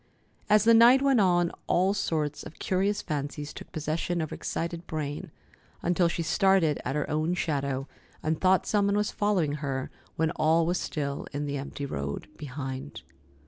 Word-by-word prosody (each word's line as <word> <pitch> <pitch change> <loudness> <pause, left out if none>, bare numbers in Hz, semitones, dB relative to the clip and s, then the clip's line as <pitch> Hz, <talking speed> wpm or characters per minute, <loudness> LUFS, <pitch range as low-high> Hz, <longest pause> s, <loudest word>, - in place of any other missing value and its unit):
As 210 -1 +6
the 230 +1 +6
night 240 +4 +7
went 270 -4 +4
on, 175 -2 +3 0.2
all 185 +3 +3
sorts 155 -7 -1
of 150 - -10
curious 200 +2 0
fancies 145 0 -4
took - - -10
possession 160 +3 -2
of 155 -2 -3
her - - -4
excited 170 0 -4
brain, 155 +3 -4 0.5
until 175 0 +3
she 170 0 -2
started 170 -2 +3
at 135 - -2
her 150 - -1
own 155 +4 0
shadow, 140 -5 -1 0.4
and 155 0 -1
thought 185 0 +4
some 205 -1 +2
one 200 0 +2
was 210 0 0
following 195 -8 +1
her 135 -3 -3 0.2
when 160 0 +1
all 160 +2 +3
was 175 +1 0
still 140 -2 -3
in 145 +1 -2
the 145 0 -2
empty 140 +1 -5
road 70 - -4
behind. 130 - -6
160 Hz, 175 wpm, -28 LUFS, 145-185 Hz, 0.5 s, night